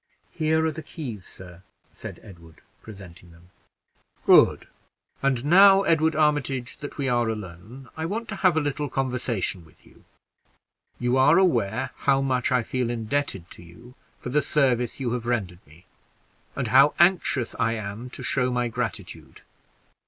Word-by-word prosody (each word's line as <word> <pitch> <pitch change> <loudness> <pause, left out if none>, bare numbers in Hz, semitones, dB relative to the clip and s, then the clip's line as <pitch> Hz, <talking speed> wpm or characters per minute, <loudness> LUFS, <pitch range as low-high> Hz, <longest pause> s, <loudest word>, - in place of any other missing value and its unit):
"Here 160 -1 +1
are 160 - +1
the 155 +1 -7
keys, 125 - -8
sir," 90 -1 -10 0.3
said - - -10
Edward, 85 -6 -15 0.2
presenting 90 -5 -13
them. 85 +2 -20 0.7
"Good. - - +5 0.6
And 135 -2 0
now, 195 +4 +7
Edward 160 -2 +2
Armitage, 145 -5 0
that 145 - -9
we 140 -2 -2
are 120 -2 +1
alone, 110 +5 -8
I 160 0 -3
want 225 +5 -4
to 195 - -5
have 180 -4 +3
a - - +3
little 145 0 -3
conversation 125 -9 -2
with 80 - -23
you. - - -21 0.9
You 125 +1 0
are 130 - +5
aware 130 - +1
how 135 -1 +2
much 130 -2 0
I 125 -2 +2
feel 125 0 -2
indebted 115 -5 -3
to - - -13
you 90 +9 -15 0.3
for - - -7
the 150 +4 +2
service 125 -6 0
you 125 -3 -2
have 120 -1 -4
rendered 100 -8 -2
me, 80 +5 -19 0.7
and - - -3
how 135 +3 +5
anxious 170 -8 +2
I 115 - +1
am 110 +2 -6
to - - -9
show 125 -2 0
my 125 -1 -1
gratitude. 115 -4 -6
125 Hz, 160 wpm, -24 LUFS, 110-145 Hz, 0.9 s, now